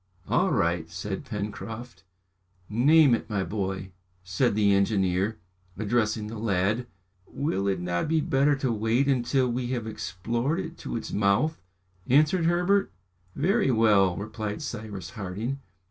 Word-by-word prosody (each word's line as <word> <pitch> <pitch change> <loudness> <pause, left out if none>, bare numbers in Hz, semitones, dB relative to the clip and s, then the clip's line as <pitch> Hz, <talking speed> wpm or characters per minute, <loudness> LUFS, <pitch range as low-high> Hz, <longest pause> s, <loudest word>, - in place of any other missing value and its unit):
"All - - +2
right!" 85 -1 0
said 95 +3 -5
Pencroft. 110 +3 -6 0.7
"Name 140 +5 +5
it, 115 - -1
my 100 -3 0
boy," 95 -2 -3 0.3
said 95 +5 +1
the 105 -2 +4
engineer, 100 +1 +1 0.4
addressing 110 0 0
the 110 +1 -6
lad. 105 +3 0 0.4
"Will 100 -10 -2
it 95 -2 0
not 90 0 -1
be 160 +1 +2
better 145 0 +2
to 135 -2 -1
wait 115 +5 +1
until 130 0 +2
we 120 0 -2
have 120 -3 -2
explored 115 - -2
it 170 -2 -5
to - - -5
its 115 - -5
mouth?" 105 +11 +1 0.5
answered 155 +6 +4
Herbert. 180 +4 +2 0.4
"Very 195 - +2
well," 105 -6 +4
replied 105 0 -4
Cyrus 105 -7 -6
Harding. 110 +6 -4
110 Hz, 135 wpm, -27 LUFS, 100-130 Hz, 0.7 s, Name